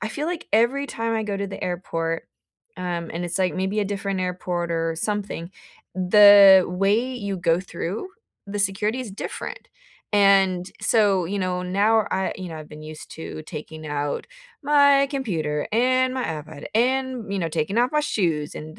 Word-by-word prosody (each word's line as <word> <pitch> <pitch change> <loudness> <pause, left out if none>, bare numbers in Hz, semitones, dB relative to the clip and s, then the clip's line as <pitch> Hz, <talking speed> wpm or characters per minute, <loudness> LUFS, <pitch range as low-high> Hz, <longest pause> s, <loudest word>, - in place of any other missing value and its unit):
I 215 - -1
feel 290 +7 -4
like 345 -1 -4
every 240 +6 +2
time 230 -3 -2
I 220 - 0
go 205 -2 -3
to 200 0 -3
the 195 - -8
airport, 165 -2 -2 0.6
um, 170 -2 -3
and 170 +2 -3
it's 175 +2 -2
like 185 -2 +1
maybe 190 +3 -1
a - - 0
different 195 -1 -3
airport 180 -1 -2
or 165 0 -1
something, 200 -2 -3 0.4
the 195 0 +8
way 200 +8 +1
you 200 -5 -4
go 170 -1 +1
through 185 - -5 0.4
the 205 +1 -4
security 205 +4 0
is 245 -5 -6
different, 345 - -7 0.5
and 195 -2 +4
so, 205 -4 +3
you 200 +4 -3
know, 180 -1 -1
now 205 +4 +2
I 190 0 -1
you 185 -1 -6
know, 165 - -7
I've 155 -1 -9
been 150 0 -10
used 155 0 -10
to 160 -1 -7
taking 155 0 -8
out 145 -1 -3 0.4
my 285 -1 +5
computer 165 - -2
and 255 +2 +2
my 260 - -2
iPad 155 -2 -6
and, 255 -2 0
you 200 - -1
know, 170 -3 -1
taking 160 +5 -2
off 245 +1 +3
my 300 - +2
shoes 165 - -1
and 155 +1 -9
195 Hz, 180 wpm, -23 LUFS, 170-220 Hz, 0.6 s, the